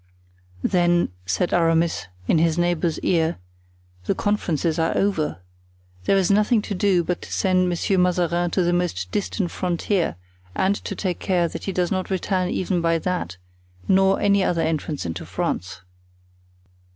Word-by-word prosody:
"Then," 175 Hz, -1 st, +2 dB, 0.2 s
said 175 Hz, -, 0 dB
Aramis, 165 Hz, -, +2 dB, 0.2 s
in 160 Hz, -, +3 dB
his 165 Hz, 0 st, +2 dB
neighbor's 175 Hz, -2 st, +1 dB
ear, 165 Hz, -2 st, +1 dB, 0.7 s
"the -, -, 0 dB
conferences 170 Hz, -6 st, 0 dB
are 165 Hz, 0 st, +1 dB
over. 160 Hz, -, 0 dB, 0.6 s
There 195 Hz, -, +3 dB
is 190 Hz, 0 st, +2 dB
nothing 210 Hz, +2 st, +3 dB
to 210 Hz, -, -4 dB
do 185 Hz, -2 st, +2 dB
but 175 Hz, +1 st, -2 dB
to -, -, -10 dB
send 185 Hz, -1 st, +2 dB
Monsieur 180 Hz, +2 st, 0 dB
Mazarin 175 Hz, -1 st, +1 dB
to 185 Hz, +2 st, +1 dB
the 175 Hz, 0 st, +1 dB
most 90 Hz, -, -1 dB
distant 195 Hz, -2 st, -2 dB
frontier 180 Hz, -, -1 dB, 0.4 s
and 195 Hz, +2 st, +2 dB
to -, -, -3 dB
take 180 Hz, -3 st, -2 dB
care 175 Hz, -3 st, +1 dB
that -, -, -7 dB
he 195 Hz, -, -1 dB
does 180 Hz, -1 st, 0 dB
not 185 Hz, -1 st, -1 dB
return 185 Hz, -1 st, 0 dB
even 185 Hz, -2 st, -1 dB
by 165 Hz, 0 st, +2 dB
that, 165 Hz, -, -3 dB, 0.5 s
nor 190 Hz, 0 st, +4 dB
any 200 Hz, -1 st, +3 dB
other 170 Hz, -3 st, +1 dB
entrance 155 Hz, -, -2 dB
into 85 Hz, -1 st, -4 dB
France." 90 Hz, 0 st, -3 dB
175 Hz, 155 wpm, -23 LUFS, 165-190 Hz, 0.7 s, nor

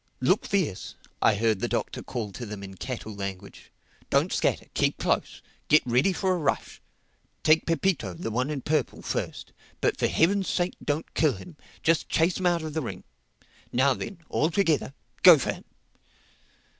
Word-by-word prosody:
"Look 165 Hz, +11 st, +2 dB
fierce," 180 Hz, -, -1 dB, 0.3 s
I 110 Hz, -, +4 dB
heard 110 Hz, -1 st, +1 dB
the -, -, -1 dB
Doctor -, -, -2 dB
call 110 Hz, -4 st, -5 dB
to 110 Hz, -, -7 dB
them 105 Hz, -3 st, -7 dB
in 95 Hz, 0 st, -8 dB
cattle 115 Hz, 0 st, -6 dB
language. 100 Hz, -1 st, -7 dB, 0.4 s
"Don't -, -, +2 dB
scatter. -, -, 0 dB
Keep -, -, +1 dB
close. -, -, -1 dB, 0.2 s
Get 150 Hz, -, +5 dB
ready 125 Hz, +9 st, +3 dB
for 190 Hz, 0 st, 0 dB
a -, -, 0 dB
rush. 145 Hz, -, -2 dB, 0.6 s
Take 155 Hz, +1 st, +4 dB
Pepito, 165 Hz, -, 0 dB
the 115 Hz, -, -4 dB
one 125 Hz, +5 st, 0 dB
in 145 Hz, -3 st, -3 dB
purple, 150 Hz, -2 st, -1 dB
first. -, -, -4 dB, 0.3 s
But -, -, 0 dB
for -, -, +3 dB
Heaven's 195 Hz, +4 st, +2 dB
sake 175 Hz, 0 st, 0 dB
don't 150 Hz, +2 st, -2 dB
kill 155 Hz, -4 st, +3 dB
him. 155 Hz, -, -11 dB, 0.3 s
Just 165 Hz, 0 st, +2 dB
chase 165 Hz, +3 st, +2 dB
him 185 Hz, -, +1 dB
out 170 Hz, -2 st, +1 dB
of 155 Hz, -1 st, -5 dB
the 160 Hz, -, -1 dB
ring—Now 130 Hz, +1 st, -3 dB
then, 190 Hz, +9 st, -6 dB
all 155 Hz, -, +1 dB
together, 160 Hz, -6 st, +1 dB, 0.3 s
go 180 Hz, -3 st, +10 dB
for 135 Hz, -, -1 dB
him!" -, -, -13 dB
145 Hz, 170 wpm, -27 LUFS, 115-170 Hz, 0.6 s, go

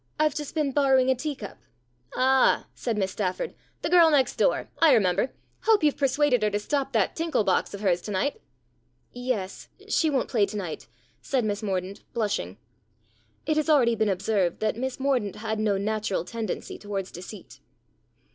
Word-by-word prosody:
I've 305 Hz, -1 st, +3 dB
just 295 Hz, 0 st, -6 dB
been 300 Hz, -3 st, +1 dB
borrowing 265 Hz, -2 st, +3 dB
a -, -, +2 dB
tea 290 Hz, +3 st, -3 dB
cup." 205 Hz, -5 st, -9 dB, 0.6 s
"Ah!" 260 Hz, +1 st, +3 dB
said 230 Hz, -3 st, -3 dB
Miss 190 Hz, -2 st, 0 dB
Stafford. 185 Hz, -2 st, -2 dB, 0.3 s
"The -, -, 0 dB
girl 345 Hz, -2 st, +7 dB
next 280 Hz, -4 st, +2 dB
door. -, -, +1 dB
I 320 Hz, -5 st, +6 dB
remember. 195 Hz, +2 st, +2 dB, 0.3 s
Hope 440 Hz, -6 st, +4 dB
you've 295 Hz, -2 st, +3 dB
persuaded 275 Hz, -2 st, +2 dB
her 210 Hz, -, +2 dB
to 205 Hz, -, -1 dB
stop 270 Hz, +6 st, -2 dB
that -, -, +1 dB
tinkle 325 Hz, -8 st, 0 dB
box 195 Hz, +1 st, 0 dB
of 200 Hz, -, -9 dB
hers 180 Hz, -4 st, +2 dB
to 210 Hz, -, -6 dB
night." 240 Hz, +9 st, -1 dB, 0.7 s
"Yes, 245 Hz, -6 st, -4 dB, 0.2 s
she 320 Hz, -, +2 dB
won't 270 Hz, -4 st, 0 dB
play 215 Hz, -6 st, +2 dB
to 210 Hz, -, -5 dB
night," 175 Hz, -, -5 dB, 0.3 s
said 260 Hz, -4 st, 0 dB
Miss 205 Hz, -1 st, -2 dB
Mordaunt, 190 Hz, -1 st, -3 dB
blushing. 215 Hz, -3 st, -2 dB, 0.9 s
It 310 Hz, -1 st, +1 dB
has 310 Hz, +1 st, 0 dB
already 255 Hz, -6 st, +5 dB
been 220 Hz, -2 st, +1 dB
observed 190 Hz, -2 st, 0 dB
that 215 Hz, -1 st, 0 dB
Miss 260 Hz, +3 st, -4 dB
Mordaunt 255 Hz, -8 st, 0 dB
had 220 Hz, 0 st, -3 dB
no 210 Hz, -2 st, +1 dB
natural 210 Hz, -2 st, -1 dB
tendency 225 Hz, -2 st, -5 dB
towards 200 Hz, -2 st, -4 dB
deceit. 185 Hz, +4 st, -10 dB
230 Hz, 175 wpm, -26 LUFS, 200-275 Hz, 0.9 s, girl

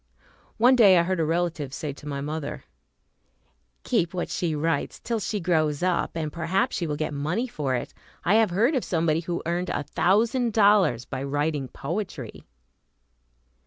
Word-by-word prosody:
One 245 Hz, +3 st, +6 dB
day 200 Hz, -7 st, +7 dB
I 170 Hz, -, +4 dB
heard 185 Hz, 0 st, -1 dB
a -, -, +2 dB
relative 165 Hz, -4 st, -1 dB
say 150 Hz, -3 st, -4 dB
to 145 Hz, -, -12 dB
my 140 Hz, -1 st, -3 dB
mother, 150 Hz, 0 st, -5 dB, 1.2 s
"Keep 185 Hz, -8 st, 0 dB
what 175 Hz, -, -3 dB
she 165 Hz, -3 st, -1 dB
writes 150 Hz, 0 st, -1 dB
till 230 Hz, -1 st, -2 dB
she 210 Hz, 0 st, -2 dB
grows 160 Hz, -4 st, +1 dB
up, 180 Hz, -2 st, 0 dB
and 155 Hz, -2 st, -3 dB
perhaps 170 Hz, +3 st, 0 dB
she 170 Hz, -, -2 dB
will 150 Hz, -, -2 dB
get 155 Hz, 0 st, -3 dB
money 160 Hz, -, -1 dB
for 140 Hz, -, -2 dB
it. 120 Hz, -, -4 dB, 0.3 s
I 180 Hz, -, +3 dB
have 220 Hz, -1 st, +4 dB
heard 220 Hz, -, +2 dB
of 260 Hz, -, 0 dB
somebody 165 Hz, -2 st, +1 dB
who 170 Hz, +1 st, -4 dB
earned 175 Hz, +2 st, -1 dB
a 145 Hz, -, -2 dB
thousand 225 Hz, -, +1 dB
dollars 200 Hz, -, +4 dB
by 130 Hz, 0 st, -5 dB
writing 145 Hz, 0 st, -1 dB
poetry." 155 Hz, -, -6 dB
170 Hz, 170 wpm, -25 LUFS, 150-195 Hz, 1.2 s, day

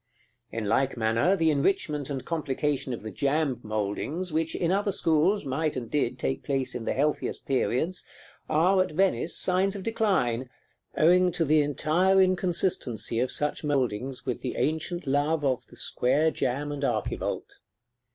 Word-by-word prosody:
In 115 Hz, -1 st, -3 dB
like 130 Hz, +5 st, +1 dB
manner, 115 Hz, -, +2 dB
the 160 Hz, -4 st, +2 dB
enrichment 150 Hz, -1 st, 0 dB
and 135 Hz, -2 st, -4 dB
complication 145 Hz, -4 st, -1 dB
of 115 Hz, -, -5 dB
the 110 Hz, -, -6 dB
jamb 140 Hz, +1 st, 0 dB
mouldings, 110 Hz, -, -3 dB
which, 160 Hz, +1 st, 0 dB
in 170 Hz, 0 st, 0 dB
other 200 Hz, +1 st, +1 dB
schools, 170 Hz, +3 st, +2 dB
might 150 Hz, +3 st, -1 dB
and 120 Hz, -3 st, -5 dB
did 130 Hz, -4 st, 0 dB
take 135 Hz, +1 st, -2 dB
place 135 Hz, -2 st, -2 dB
in 120 Hz, -2 st, -5 dB
the -, -, 0 dB
healthiest 150 Hz, +2 st, -1 dB
periods, 140 Hz, +6 st, 0 dB, 0.5 s
are, 180 Hz, +5 st, +3 dB
at 185 Hz, -, -2 dB
Venice, 170 Hz, -3 st, +1 dB
signs 190 Hz, +2 st, +2 dB
of 195 Hz, -, -6 dB
decline, 155 Hz, -, 0 dB, 0.5 s
owing 180 Hz, +3 st, +5 dB
to 165 Hz, -, +1 dB
the 155 Hz, +1 st, +4 dB
entire 165 Hz, +6 st, +2 dB
inconsistency 175 Hz, -, +1 dB
of 125 Hz, +1 st, 0 dB
such 150 Hz, +1 st, 0 dB
mouldings 130 Hz, -3 st, -1 dB
with 125 Hz, -3 st, -3 dB
the -, -, -4 dB
ancient 160 Hz, +3 st, -1 dB
love 145 Hz, +3 st, +1 dB
of 130 Hz, -2 st, -1 dB
the -, -, -16 dB
single -, -, -1 dB
square 150 Hz, +6 st, +2 dB
jamb 140 Hz, +2 st, -2 dB
and 145 Hz, -1 st, -5 dB
archivolt. 115 Hz, -5 st, -2 dB
150 Hz, 160 wpm, -27 LUFS, 130-175 Hz, 0.5 s, owing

